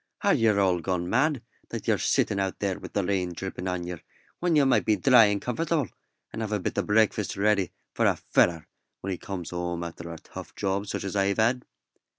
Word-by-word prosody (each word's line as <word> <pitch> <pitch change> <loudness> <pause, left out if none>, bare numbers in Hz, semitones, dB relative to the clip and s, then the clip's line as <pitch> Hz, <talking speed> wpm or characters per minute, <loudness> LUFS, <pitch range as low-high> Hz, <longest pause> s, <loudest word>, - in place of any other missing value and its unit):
"Are - - +4
yer 110 -3 +3
all 95 -3 +3
gone 90 0 -2
mad 130 - +1 0.3
that - - -6
yer - - +3
sitting 100 - +1
out 95 -1 -1
there 100 -2 -2
wi' - - -7
the 100 - 0
rain 90 -2 -1
drippin' 95 +1 -5
on 90 -1 -2
yer, 90 -2 -6 0.4
when 175 -2 +1
yer 145 -2 +5
might 135 - +3
be 110 - +3
dry 115 +3 +6
an' 100 0 0
comfortable, 150 - -1 0.4
and 115 - -4
have 110 -1 -3
a 105 - +1
bit - - -2
o' - - +3
breakfast 105 -2 +1
ready 100 -2 +2 0.2
for - - +2
a - - +3
feller 85 -3 +1 0.3
when 95 - -3
he 90 - -2
comes 95 -4 -6
home 85 -1 -3
after 85 0 -7
a 85 - -7
tough - - -11
job 100 +1 -1
such - - -3
as 100 0 -4
I've 100 0 +1
had?" 120 +3 +2
100 Hz, 220 wpm, -27 LUFS, 90-110 Hz, 0.4 s, dry